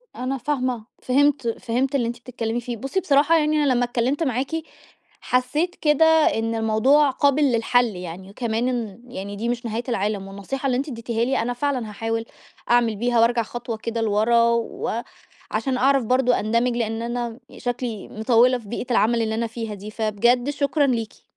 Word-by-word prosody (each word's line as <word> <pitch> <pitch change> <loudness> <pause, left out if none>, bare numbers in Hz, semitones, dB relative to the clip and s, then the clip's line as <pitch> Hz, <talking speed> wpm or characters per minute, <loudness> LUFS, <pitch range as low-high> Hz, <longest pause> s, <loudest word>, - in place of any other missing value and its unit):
أنا 260 +2 -2
فاهمة، 255 -3 -2 0.2
فهمت 280 0 +2
فهمت 250 +4 -1
اللي 240 -4 +1
أنتِ 235 +1 -5
بتتكلمي 235 -1 -3
فيه. 240 0 -5
بُصي 270 - -2
بصراحة 305 +1 +4
يعني 305 -1 +2
أنا 275 -3 +3
لمّا 245 0 +2
اتكلمت 245 +5 0
معاكِ 260 -1 -1 0.7
حسيت 295 +8 0
كده 300 +1 +3
إن 265 -8 +3
الموضوع 225 +7 +3
قابل 280 +2 +2
للحل 245 -1 +3
يعني، 180 +1 -8
وكمان 230 +2 -2
إن 235 -3 -3
يعني 200 -3 -6
دي 230 +4 -2
مش 240 0 -3
نهاية 230 +1 -2
العالم. 205 -3 -1
والنصيحة 200 +8 -6
اللي 250 -2 +1
أنتِ 280 +4 -2
اديتيها 230 -2 -2
لي 265 +2 0
أنا 245 +2 -1
فعلًا 250 -3 -2
هاحاول 225 +2 -3 0.5
أعمل 235 -2 +3
بيها 240 +3 +1
وأرجع 235 0 +3
خطوة 235 0 -5
كده 230 +1 -3
لورا 225 +2 +3
و 235 0 -2 0.5
عشان 265 -2 -1
أعرف 270 +1 +3
برضو 250 +2 +3
أندمج، 235 +2 +1
لأن 225 -1 -2
أنا 235 0 -3 0.2
شكلي 245 -4 -4
مطوّلة 235 +3 +3
في 230 -4 -13
بيئة 240 +2 -4
العمل 230 0 +3
اللي 220 -1 -1
أنا 230 +1 -1
فيها 225 -1 -5
دي، 205 +1 -8
فبجد 235 +4 +1
شكرًا 290 0 +1
ليكِ. 230 -4 -3
240 Hz, 175 wpm, -23 LUFS, 225-260 Hz, 0.7 s, بصراحة